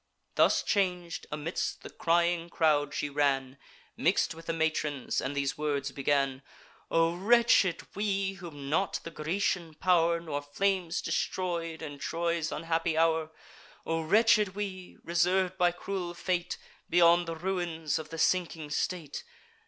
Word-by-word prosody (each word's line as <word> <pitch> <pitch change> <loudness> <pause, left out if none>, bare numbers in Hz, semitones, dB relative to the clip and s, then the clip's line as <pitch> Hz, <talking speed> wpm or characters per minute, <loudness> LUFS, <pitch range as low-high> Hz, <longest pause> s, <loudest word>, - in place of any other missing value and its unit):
Thus - - +4
chang'd, 180 -4 -1
amidst 150 +3 -3
the - - -9
crying 170 0 +1
crowd 150 -4 +2
she 150 - -2
ran, 140 -2 0 0.4
Mix'd - - +2
with 165 0 -13
the - - +1
matrons, 155 -4 -1
and 140 +2 -3
these 140 +1 -1
words 140 -2 -1
began: 135 -1 0 0.5
"O 165 0 +3
wretched 200 -2 +4
we, 195 -2 0
whom 165 -7 -9
not 165 +7 0
the 165 - -7
Grecian 165 0 -1
pow'r, 170 -1 +3
Nor 155 -4 -4
flames, 180 +4 -1
destroy'd, 170 -3 -2
in 145 -2 -7
Troy's 170 0 -1
unhappy 165 0 -1
hour! 160 -1 +2 0.6
O 165 0 0
wretched 210 +2 +4
we, 190 -3 -5
reserv'd 180 +2 +1
by 175 0 +4
cruel 175 -1 -4
fate, 180 0 -2 0.3
Beyond 175 0 +5
the 165 - -3
ruins 170 -3 -2
of 155 -1 -8
the 165 - -7
sinking 165 -3 0
state! 155 -1 -2
165 Hz, 135 wpm, -30 LUFS, 155-180 Hz, 0.6 s, Beyond